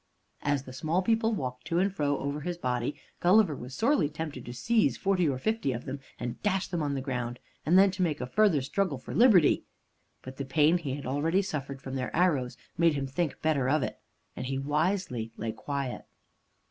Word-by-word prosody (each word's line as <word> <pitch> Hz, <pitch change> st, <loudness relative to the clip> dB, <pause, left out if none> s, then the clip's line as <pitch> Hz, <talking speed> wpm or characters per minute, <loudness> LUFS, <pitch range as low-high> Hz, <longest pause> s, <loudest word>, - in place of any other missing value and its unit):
As 145 Hz, -2 st, 0 dB
the 130 Hz, -, -10 dB
small 160 Hz, +7 st, 0 dB
people 225 Hz, +2 st, +2 dB
walked 125 Hz, -6 st, -5 dB
to 170 Hz, 0 st, 0 dB
and 190 Hz, +2 st, +2 dB
fro 145 Hz, -5 st, 0 dB
over 140 Hz, +2 st, -3 dB
his 175 Hz, +3 st, -3 dB
body, 125 Hz, -3 st, -2 dB, 0.2 s
Gulliver 185 Hz, -3 st, +4 dB
was 125 Hz, +1 st, -8 dB
sorely 220 Hz, -, +2 dB
tempted 155 Hz, -4 st, -5 dB
to -, -, -5 dB
seize 220 Hz, -, +2 dB
forty 185 Hz, -5 st, +2 dB
or 135 Hz, -, -1 dB
fifty 220 Hz, -, 0 dB
of 120 Hz, -, -6 dB
them 135 Hz, +1 st, -4 dB, 0.2 s
and 120 Hz, 0 st, -5 dB
dash 195 Hz, -2 st, 0 dB
them 175 Hz, -3 st, -2 dB
on 145 Hz, -2 st, -1 dB
the 135 Hz, -, -2 dB
ground, 125 Hz, -2 st, -3 dB, 0.3 s
and 175 Hz, +4 st, +6 dB
then 195 Hz, 0 st, +6 dB
to 185 Hz, 0 st, -4 dB
make 160 Hz, -5 st, +1 dB
a 125 Hz, -, -2 dB
further 165 Hz, 0 st, +3 dB
struggle 165 Hz, +1 st, -1 dB
for 130 Hz, -, -8 dB
liberty. 215 Hz, -, +5 dB, 0.6 s
But 130 Hz, 0 st, -9 dB
the 140 Hz, -, -3 dB
pain 155 Hz, +5 st, +3 dB
he 140 Hz, -5 st, -3 dB
had 140 Hz, -, -7 dB
already 160 Hz, +9 st, +1 dB
suffered 140 Hz, -6 st, -5 dB
from 130 Hz, -, -6 dB
their 130 Hz, -, -3 dB
arrows 150 Hz, -8 st, +2 dB, 0.2 s
made 165 Hz, -2 st, +4 dB
him 140 Hz, -1 st, -1 dB
think 140 Hz, +4 st, -2 dB
better 140 Hz, -5 st, +2 dB
of 150 Hz, 0 st, +2 dB
it, -, -, -4 dB, 0.4 s
and -, -, -4 dB
he 135 Hz, 0 st, -2 dB
wisely 145 Hz, -, -1 dB
lay 110 Hz, +1 st, -2 dB
quiet. 140 Hz, 0 st, -4 dB
145 Hz, 210 wpm, -29 LUFS, 130-180 Hz, 0.6 s, and